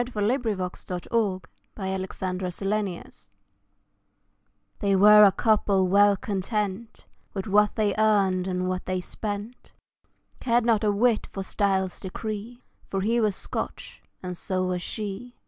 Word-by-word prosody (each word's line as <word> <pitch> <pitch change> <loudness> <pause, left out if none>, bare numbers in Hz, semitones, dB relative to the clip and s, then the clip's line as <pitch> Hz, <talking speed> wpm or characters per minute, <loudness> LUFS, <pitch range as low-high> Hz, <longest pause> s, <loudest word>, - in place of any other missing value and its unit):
For 210 -3 -2
He 230 +5 +3
was 205 -8 -2
Scotch 180 -1 -6 0.4
and - - -23
so - - -43
was 190 -2 -3
She 190 +1 -4 1.3
They 200 -2 +2
were 210 +2 +8
a 200 - +7
couple 200 -3 +2
well 200 +1 +5
content 205 +2 -3 0.3
With 195 - -3
what 210 0 +3
they 210 -2 +1
earned 195 -4 +2
and 180 0 -1
what 185 0 -3
they 185 0 -1
spent, 210 +5 -6 0.7
Cared 240 -2 +1
not 225 -2 +2
a 210 - +3
whit 225 +2 +2
for 195 - -6
style's 190 -1 0
decree, 215 +5 -6 0.2
For 195 - -2
he 230 +4 +1
was 210 -3 +1
Scotch, - - -6 0.2
and 180 0 -4
so 185 +1 -2
was 180 -1 -1
she. 215 +5 -5
200 Hz, 145 wpm, -26 LUFS, 185-215 Hz, 1.3 s, were